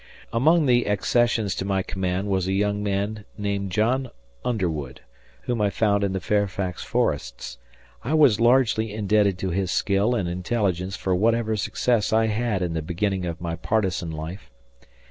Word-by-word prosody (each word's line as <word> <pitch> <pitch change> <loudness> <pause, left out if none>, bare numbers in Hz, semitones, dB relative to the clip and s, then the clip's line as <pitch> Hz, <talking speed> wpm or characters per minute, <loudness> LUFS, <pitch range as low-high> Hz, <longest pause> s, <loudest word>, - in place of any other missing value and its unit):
Among 155 +7 +4
the 120 -2 +3
accessions 110 0 +1
to - - -3
my 95 -1 0
command 95 +1 -2
was 95 -2 0
a 95 - 0
young 105 +1 0
man 100 +1 -2
named 100 -2 -2
John 120 +7 +1 0.3
Underwood, 80 - -2 0.4
whom 120 -3 -1
I 105 - +3
found 100 -1 +1
in 100 - 0
the 95 - -2
Fairfax 95 -1 -1
forests. - - -2 0.4
I 145 +7 0
was 140 -9 +5
largely 115 -3 +3
indebted 105 -2 +2
to 95 0 -3
his 95 +1 -1
skill 100 +6 +1
and 100 -6 -1
intelligence 90 0 -1
for 95 - -1
whatever 110 +3 +2
success 110 +2 0
I 110 0 +3
had 110 -4 0
in 85 -2 -2
the 80 - -2
beginning 90 +3 -2
of 85 0 -5
my 85 -2 -3
partisan 90 0 -1
life. 80 +5 -7
100 Hz, 165 wpm, -24 LUFS, 90-110 Hz, 0.4 s, was